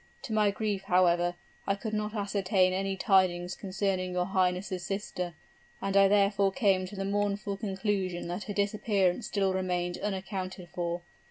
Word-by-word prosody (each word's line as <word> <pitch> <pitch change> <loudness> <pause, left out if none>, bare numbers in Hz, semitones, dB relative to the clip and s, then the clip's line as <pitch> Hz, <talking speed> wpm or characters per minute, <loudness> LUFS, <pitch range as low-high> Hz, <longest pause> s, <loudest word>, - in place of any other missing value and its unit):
To 230 - -4
my 210 -1 +4
grief, 200 -1 -2
however, 175 -1 +3 0.3
I 195 - +2
could 215 +2 -5
not 210 +1 -2
ascertain 195 -2 +2
any 195 +1 -1
tidings 180 -2 +2
concerning 190 -2 -2
your 180 0 +1
highness' 185 0 0
sister; 180 -4 -4 0.4
and 195 0 -2
I 195 0 +7
therefore 200 0 +3
came 190 -5 +2
to 205 - -9
the 195 0 -3
mournful 200 0 -1
conclusion 195 -3 -2
that 180 +3 -4
her 205 - -4
disappearance 200 -1 +1
still 195 -2 +1
remained 180 -1 -1
unaccounted 190 -2 -4
for. 175 0 -3
195 Hz, 155 wpm, -30 LUFS, 185-200 Hz, 0.4 s, I